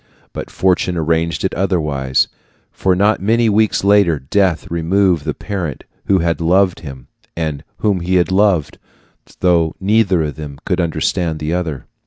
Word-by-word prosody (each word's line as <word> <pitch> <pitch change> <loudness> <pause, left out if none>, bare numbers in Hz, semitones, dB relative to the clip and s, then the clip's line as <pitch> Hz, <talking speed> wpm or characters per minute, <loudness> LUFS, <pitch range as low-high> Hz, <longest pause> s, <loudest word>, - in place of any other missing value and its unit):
But - - -6
fortune 90 -1 0
arranged 80 +1 0
it 95 - -1
otherwise; 75 -9 0 0.4
for 95 -1 0
not 105 +3 +2
many 115 +3 +2
weeks 110 0 +2
later 100 -5 +4
death 85 +5 0
removed 85 -1 +1
the - - -2
parent 90 -9 -5 0.2
who 95 - +3
had 85 -1 -1
loved 90 +2 +2
him 65 -5 -10 0.3
and 80 -3 -3
whom 100 -4 0
he 90 +2 -1
had 90 -1 +2
loved, 95 -6 +1 0.6
though 85 -3 +2
neither 95 -3 +2
of 75 -1 -5
them 75 -3 -8
could 90 -2 0
understand 80 0 -1
the 75 +2 -3
other. 85 -6 -3
90 Hz, 155 wpm, -17 LUFS, 80-95 Hz, 0.6 s, later